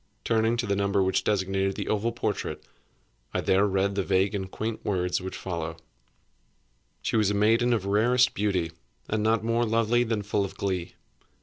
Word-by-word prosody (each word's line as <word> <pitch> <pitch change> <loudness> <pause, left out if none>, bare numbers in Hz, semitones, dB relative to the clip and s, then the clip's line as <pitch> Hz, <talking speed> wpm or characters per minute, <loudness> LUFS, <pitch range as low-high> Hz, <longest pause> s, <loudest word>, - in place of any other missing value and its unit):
Turning 115 +1 +2
to 120 - -1
the 100 - 0
number 100 0 +1
which 95 0 +1
designated 95 -1 0
the - - -4
oval 110 +2 0
portrait, 120 - -3 0.7
I - - +1
there 95 +2 +3
read 100 +1 +1
the 100 - 0
vague 95 +1 +1
and 95 -2 -3
quaint 110 +3 -4
words 90 -2 0
which 95 0 -6
follow: 85 -3 -4 1.3
"She - - -1
was 105 -2 +3
a 105 - 0
maiden 115 +4 +3
of 110 -5 +1
rarest 120 +5 +3
beauty, 95 -5 0 0.4
and 110 0 -1
not 110 0 +2
more 115 +1 +1
lovely 115 +1 +2
than 110 -3 -2
full 105 0 0
of 100 - -6
glee. 90 -3 -3
100 Hz, 180 wpm, -27 LUFS, 95-115 Hz, 1.3 s, there